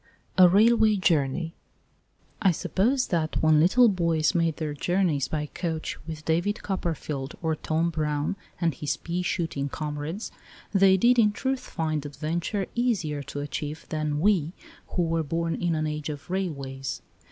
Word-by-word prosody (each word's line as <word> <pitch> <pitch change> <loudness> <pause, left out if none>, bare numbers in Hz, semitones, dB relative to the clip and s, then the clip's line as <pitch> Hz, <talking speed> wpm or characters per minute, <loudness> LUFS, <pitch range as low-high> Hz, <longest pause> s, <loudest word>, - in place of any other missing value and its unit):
A 180 -1 +8
RAILWAY 220 +2 +5
JOURNEY 165 -2 +1 0.9
I 195 - +5
SUPPOSE 235 - +1
that 160 -3 0
when 155 -1 +5
little 235 +10 +6
boys 170 -6 +2
made 165 -3 +1
their 155 -2 -3
journeys 165 -3 +1
by 150 -1 -2
coach 160 +1 -3
with 155 -1 -7
David 175 +6 0
Copperfield 155 -7 -3
or 160 -1 +1
Tom 160 +2 0
Brown 150 +2 -1 0.2
and 170 -3 +1
his 150 0 -2
pea 175 +1 -3
shooting 165 -6 -2
com 150 +1 -4
rades 165 +9 -5 0.4
they 195 -1 +6
did 240 +5 +4
in 210 -2 +5
truth 265 +5 -1
find 160 - -3
adventure 160 - -2
easier 200 - 0
to 145 +1 -6
achieve 150 +1 -5
than 155 -2 -1
we 175 -3 +2 0.3
who 180 - -1
were 165 0 +1
born 165 +2 -1
in 175 -2 0
an 155 0 0
age 150 0 -3
of 150 +3 -7
railways. 135 -9 -3
165 Hz, 155 wpm, -26 LUFS, 150-185 Hz, 0.9 s, A